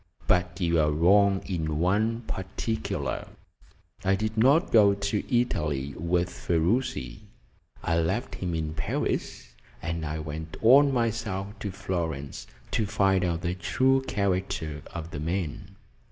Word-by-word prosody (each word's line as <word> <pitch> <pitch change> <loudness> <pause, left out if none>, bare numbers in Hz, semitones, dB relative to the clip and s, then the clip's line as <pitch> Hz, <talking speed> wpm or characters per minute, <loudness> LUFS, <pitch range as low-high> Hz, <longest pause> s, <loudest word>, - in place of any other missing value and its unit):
But 90 +1 +1
you 85 -2 +2
are 75 -1 +3
wrong 95 +6 +4
in 80 -5 -2
one 105 +7 +1
particular. 110 +1 -3 0.8
I 95 +1 +3
did 110 +2 -2
not 135 +10 +4
go 100 -3 +6
to 100 +1 -1 0.2
Italy 75 - -1
with 85 +2 0
Ferruci 85 - -1 0.6
I 85 0 +1
left 95 +10 -1
him 90 -3 -3
in 80 -1 -2
Paris, 75 -4 -3 0.3
and 85 0 -3
I 75 0 -3
went 80 +2 -6
on 140 +5 +7
myself 115 -5 -1
to 105 - -3
Florence 85 -7 -4 0.2
to 110 - 0
find 95 -2 +2
out 85 -2 -1
the 90 -1 -1
true 130 +11 +2
character 90 -6 -1
of 85 -1 -6
the 75 - -5
man." 95 +4 -3
90 Hz, 135 wpm, -27 LUFS, 80-105 Hz, 0.8 s, on